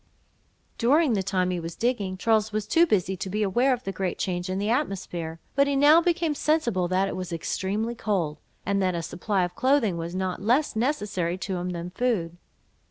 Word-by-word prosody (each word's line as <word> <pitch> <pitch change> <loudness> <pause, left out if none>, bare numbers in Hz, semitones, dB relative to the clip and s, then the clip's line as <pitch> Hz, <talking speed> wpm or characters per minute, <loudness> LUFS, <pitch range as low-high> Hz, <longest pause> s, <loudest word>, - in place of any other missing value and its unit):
During 275 +3 +4
the 200 - +1
time 185 -1 0
he 180 - -2
was 165 0 -6
digging, 210 -6 -1
Charles 220 +1 +2
was 215 -1 -2
too 335 +8 +4
busy 190 - +1
to 190 - -4
be 210 +3 0
aware 240 +7 +2
of 250 -1 -1
the 195 - -3
great 190 -2 -3
change 180 0 -2
in 185 - -1
the 205 +3 0
atmosphere; 180 - -2
but 280 0 +3
he 280 - +1
now 295 +4 +6
became 340 -2 +1
sensible 245 - +1
that 185 +2 +1
it - - -4
was 185 -1 -5
extremely 200 +7 -2
cold, 180 -10 -2 0.3
and 200 0 +1
that 185 -2 +1
a 170 - -3
supply 185 +3 -1
of 175 0 -3
clothing 255 -8 +2
was 170 +2 -5
not 185 -1 -2
less 245 +8 +2
necessary 210 - -1
to 190 0 -3
him 180 +1 -3
than 175 0 -5
food. 180 -7 -1
195 Hz, 205 wpm, -26 LUFS, 180-240 Hz, 0.3 s, now